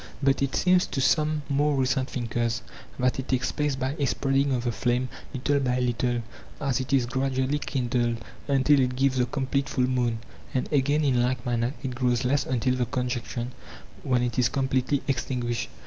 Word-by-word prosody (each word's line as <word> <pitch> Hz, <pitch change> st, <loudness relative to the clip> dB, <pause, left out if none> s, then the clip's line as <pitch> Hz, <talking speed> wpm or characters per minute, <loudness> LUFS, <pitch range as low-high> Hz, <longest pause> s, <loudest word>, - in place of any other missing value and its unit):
But 135 Hz, 0 st, +3 dB
it 140 Hz, -1 st, 0 dB
seems 180 Hz, 0 st, +3 dB
to 140 Hz, -, -3 dB
some 150 Hz, +2 st, +2 dB
more 145 Hz, +1 st, +2 dB
recent 130 Hz, 0 st, +1 dB
thinkers 115 Hz, -2 st, -2 dB, 0.3 s
that 125 Hz, 0 st, +1 dB
it 130 Hz, -, -4 dB
takes 130 Hz, -1 st, 0 dB
place 150 Hz, -2 st, 0 dB
by 130 Hz, +2 st, -2 dB
a 140 Hz, -, +2 dB
spreading 135 Hz, +2 st, +1 dB
of 125 Hz, -2 st, 0 dB
the 120 Hz, -, 0 dB
flame 125 Hz, +2 st, 0 dB, 0.2 s
little 140 Hz, +2 st, +1 dB
by 125 Hz, -2 st, 0 dB
little 120 Hz, -1 st, 0 dB, 0.4 s
as 135 Hz, -4 st, 0 dB
it 130 Hz, -, -4 dB
is 135 Hz, -3 st, +3 dB
gradually 130 Hz, +2 st, 0 dB
kindled, 120 Hz, -4 st, 0 dB, 0.3 s
until 140 Hz, +1 st, +4 dB
it 125 Hz, -1 st, +1 dB
gives 135 Hz, 0 st, +2 dB
the 125 Hz, -1 st, +2 dB
com 135 Hz, +1 st, -2 dB
plete 140 Hz, +1 st, 0 dB
full 130 Hz, -1 st, +1 dB
moon, 125 Hz, -3 st, 0 dB, 0.4 s
and 130 Hz, -, 0 dB
again, 145 Hz, +2 st, +3 dB
in 130 Hz, -4 st, +3 dB
like 125 Hz, 0 st, 0 dB
manner, 120 Hz, +2 st, 0 dB
it 130 Hz, -2 st, -3 dB
grows 125 Hz, 0 st, +1 dB
less 135 Hz, +2 st, +1 dB
until 125 Hz, 0 st, +1 dB
the 125 Hz, -2 st, 0 dB
conjunction, 125 Hz, -1 st, -3 dB, 0.5 s
when 125 Hz, -2 st, +1 dB
it 120 Hz, 0 st, -1 dB
is 125 Hz, -1 st, +4 dB
completely 130 Hz, +1 st, 0 dB
extin 125 Hz, -1 st, -1 dB
guished. 120 Hz, -1 st, -2 dB
130 Hz, 195 wpm, -26 LUFS, 125-135 Hz, 0.5 s, until